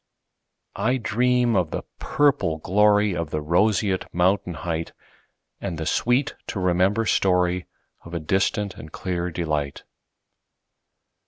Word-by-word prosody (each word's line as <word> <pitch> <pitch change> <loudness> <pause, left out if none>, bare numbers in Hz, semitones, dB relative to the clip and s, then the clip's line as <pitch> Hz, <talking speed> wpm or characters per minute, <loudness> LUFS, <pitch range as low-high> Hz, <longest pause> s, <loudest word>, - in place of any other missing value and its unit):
I 125 +6 +1
dream 125 0 +1
of 90 -4 +1
the - - -4 0.2
purple 135 - +1
gloryOf 105 -3 +2
the 75 - -2
roseate 95 +5 +1
mountain 90 0 +1
heightAnd 85 +2 -7
the 80 - -4
sweet 125 - +1
to 100 - -3
remember 95 +5 +2
storyOf 90 -3 +2 0.5
a 85 - -2
distant 95 +4 0
and 75 - -10
clear 90 -1 -3
delight. 75 -4 -3
95 Hz, 105 wpm, -24 LUFS, 85-105 Hz, 0.5 s, gloryOf